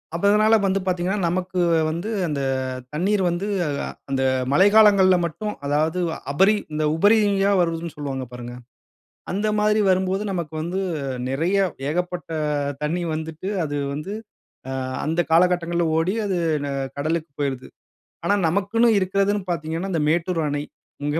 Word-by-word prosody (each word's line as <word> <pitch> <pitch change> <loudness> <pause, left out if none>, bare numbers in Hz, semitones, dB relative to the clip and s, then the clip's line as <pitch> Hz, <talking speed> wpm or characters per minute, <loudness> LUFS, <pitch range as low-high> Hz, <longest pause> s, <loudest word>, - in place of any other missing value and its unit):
அப்ப 170 - -4
இதனால 215 +1 +5
வந்து 195 0 +1
பார்த்தீங்கனா, 185 +2 0
நமக்கு 185 +1 -2 0.3
வந்து 170 +7 -3 0.2
அந்த 145 -3 -2 0.5
தண்ணீர் 195 +6 +1
வந்து 175 +4 -2 0.2
அ - - -1 0.4
அந்த 135 -1 0 0.3
மழைக்காலங்கள்ல 200 +2 +6
மட்டும் 210 +6 -4
அதாவது, 155 +4 +1 0.3
அபரி 190 +9 +4 0.2
இந்த 155 0 -1
உபரியா 200 +1 +3
வருதுன்னு 165 -1 -1
சொல்லுவாங்க 135 -3 -4
பாருங்க. 120 0 -8 0.8
அந்த 205 +4 0
மாதிரி 210 +1 +3
வரும்போது 190 +1 +1
நமக்கு 170 -4 -4
வந்து 175 +4 -2 0.5
நெறைய 165 +9 0 0.3
ஏகப்பட்ட 180 +2 -3 0.5
தண்ணி 165 +4 -1
வந்துட்டு, 160 +3 -5 0.2
அது 145 -1 -3 0.2
வந்து 150 +7 -5 0.6
அ - - -4 0.3
அந்த 165 +3 +1
காலகட்டங்கள்ல 175 0 +3
ஓடி, 175 +5 +1
அது 190 -3 0 0.3
ந - - -3 0.3
கடலுக்கு 155 +2 -2
போயுருது. 135 -3 -2 0.6
ஆனா, 200 - +3
நமக்குன்னு 200 +7 +2
இருக்கிறதுன்னு 195 +2 0
பார்த்தீங்கன்னா, 165 +3 -3
அந்த 160 - +1
மேட்டூர் 170 +1 0
அணை. 145 0 -2 0.4
மிக 145 +2 0
175 Hz, 135 wpm, -23 LUFS, 155-195 Hz, 0.8 s, மழைக்காலங்கள்ல